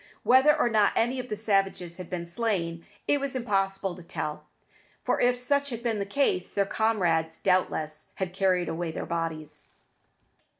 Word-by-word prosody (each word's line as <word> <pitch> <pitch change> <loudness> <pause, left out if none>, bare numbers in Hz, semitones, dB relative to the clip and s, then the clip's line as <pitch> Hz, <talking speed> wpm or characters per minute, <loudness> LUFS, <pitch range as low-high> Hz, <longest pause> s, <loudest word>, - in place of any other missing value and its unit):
Whether 270 +4 +6
or 270 - +3
not 215 -3 +3
any 245 +3 +1
of 250 0 -6
the 210 - -1
savages 195 -4 0
had 185 -2 -8
been 175 -2 -3
slain, 170 -4 -2 0.2
it 290 - +3
was 275 -1 -2
impossible 195 -5 0
to 180 - -11
tell, 150 -2 -5 0.6
for - - +1
if 245 0 +3
such 280 +3 +1
had 235 -2 -6
been 225 -3 0
the 200 - -2
case, 200 -6 0
their 200 - +3
comrades, 175 -7 +1
doubtless, 155 -5 0
had 185 -2 -3
carried 185 -2 +2
away 165 0 -2
their - - -5
bodies. 165 -2 -4
195 Hz, 170 wpm, -27 LUFS, 170-235 Hz, 0.6 s, Whether